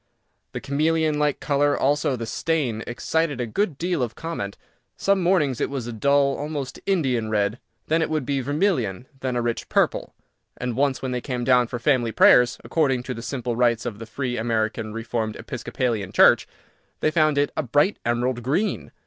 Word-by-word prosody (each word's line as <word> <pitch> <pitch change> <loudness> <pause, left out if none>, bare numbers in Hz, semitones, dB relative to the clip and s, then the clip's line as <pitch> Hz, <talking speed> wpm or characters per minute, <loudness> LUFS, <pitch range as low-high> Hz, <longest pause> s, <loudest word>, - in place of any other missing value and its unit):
The - - -3
chameleon 155 +2 +1
like 150 -1 +1
colour, 145 0 +1
also, 145 0 +1
of - - -2
the 115 - -4
stain 120 -3 -1
excited 145 +3 -1
a 120 - 0
good 160 - -1
deal 175 -2 -1
of 120 -2 -2
comment. 160 -12 -5 0.4
Some 195 -1 +2
mornings 170 -9 +2
it - - 0
was 135 -4 -4
a 120 - -5
dull 140 +4 +2
(almost 145 -3 -5
Indian) 130 - +1
red, 105 +2 0 0.3
then 160 +1 +1
it 160 - 0
would 155 -4 -1
be 140 +1 0
vermilion, 130 - 0
then 130 -2 -2
a 120 - 0
rich 120 -1 -3
purple, - - 0 0.4
and 125 -2 -3
once 135 0 0
when 130 - -2
they 125 -1 -2
came 125 -2 -3
down 125 -1 +4
for 120 - -4
family 120 -2 +1
prayers, 125 +2 +5
according 135 -6 +1
to 125 - -4
the 115 - -7
simple 125 -1 -3
rites 120 -1 +2
of 110 -4 -5
the 115 - -8
Free 125 +1 -3
American 110 -1 -1
Reformed 115 -1 -3
Episcopalian 120 -4 -3
Church, - - +5 0.5
they 155 - +2
found 155 -2 +2
it 145 0 +2
a - - +1
bright 145 - +1
emerald 120 +1 0
green. 150 - -1
130 Hz, 190 wpm, -24 LUFS, 120-150 Hz, 0.5 s, prayers